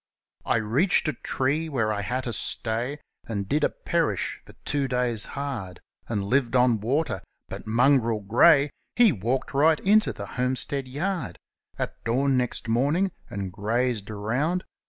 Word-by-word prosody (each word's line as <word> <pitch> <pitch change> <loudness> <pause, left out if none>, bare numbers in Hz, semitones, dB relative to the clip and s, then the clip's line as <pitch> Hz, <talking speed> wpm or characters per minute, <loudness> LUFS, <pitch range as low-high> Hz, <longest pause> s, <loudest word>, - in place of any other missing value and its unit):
I - - +2
reached 115 - +2
a 155 - 0
tree, 150 +5 -1
where 115 -7 0
I 105 - -2
had 125 +6 -2
to 120 - -3
stay, 120 +7 -2 0.3
And 100 -3 -3
did 150 +5 +1
a - - +4
perish - - -1
for - - -16
two 140 -2 0
days' 125 -3 0
hard; 120 -11 -4 0.3
And 105 -4 -1
lived 125 +3 +1
on 125 -3 +4
water 140 +7 0
— - - -53
but - - -8
Mongrel 115 -1 +3
Grey, 140 +8 +5 0.2
He 240 -4 +6
walked 120 - -2
right 155 +3 +4
into 215 +2 +4
the - - -7
homestead 130 +2 -1
yard 170 +8 -3 0.4
At - - -5
dawn 135 +4 +1
next 125 -1 -1
morninfi;, 145 +12 +1 0.2
and 100 -2 -4
grazed 110 +1 -1
around. 125 - -1
125 Hz, 155 wpm, -26 LUFS, 110-145 Hz, 0.4 s, He